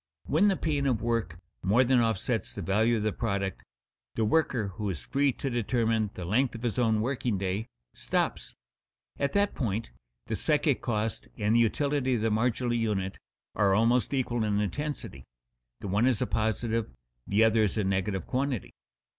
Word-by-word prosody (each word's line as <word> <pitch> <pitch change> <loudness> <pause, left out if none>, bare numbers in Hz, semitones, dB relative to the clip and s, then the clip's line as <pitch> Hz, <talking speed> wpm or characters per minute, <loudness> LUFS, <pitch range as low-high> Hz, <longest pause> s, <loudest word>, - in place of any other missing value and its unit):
When 170 +8 +3
the 195 -2 +2
pain 145 -3 0
of 120 -5 0
work 115 -8 -1 0.2
more 105 +8 +4
than 130 0 +3
offsets 115 0 -1
the 100 - -4
value 110 +6 +2
of 105 - -2
the 110 -1 0
product, 100 -4 -2 0.5
the 110 - +1
worker 120 -5 +1
who 105 +2 -4
is 75 -10 -4
free 140 0 +2
to 135 - -5
determine 115 -3 +1
the 90 - -5
length 120 +8 +1
of 115 - -8
his 120 0 -1
own 110 -3 +2
working 120 -3 -1
day, 95 +4 -2 0.3
stops. - - -2 0.6
At 140 0 0
that 200 0 +2
point 115 - -2 0.3
the - - -2
psychic - - +1
cost 110 - -2
and 105 +2 +1
the - - +5
utility 130 +3 +1
of 115 - -1
the 110 0 +1
marginal 120 +2 +1
unit 105 -5 -1 0.3
are 100 -2 +3
almost 115 +4 +3
equal 120 -4 0
in 105 -1 +1
intensity 105 - -4 0.6
the - - -5
one 105 +6 +2
as 125 -5 +2
a - - +1
positive, 110 +1 -1 0.4
the 105 +3 +3
other 110 0 +4
as 105 0 +1
a 105 - +1
negative 95 -1 -1
quantity. 130 -4 -2
115 Hz, 180 wpm, -28 LUFS, 105-125 Hz, 0.6 s, the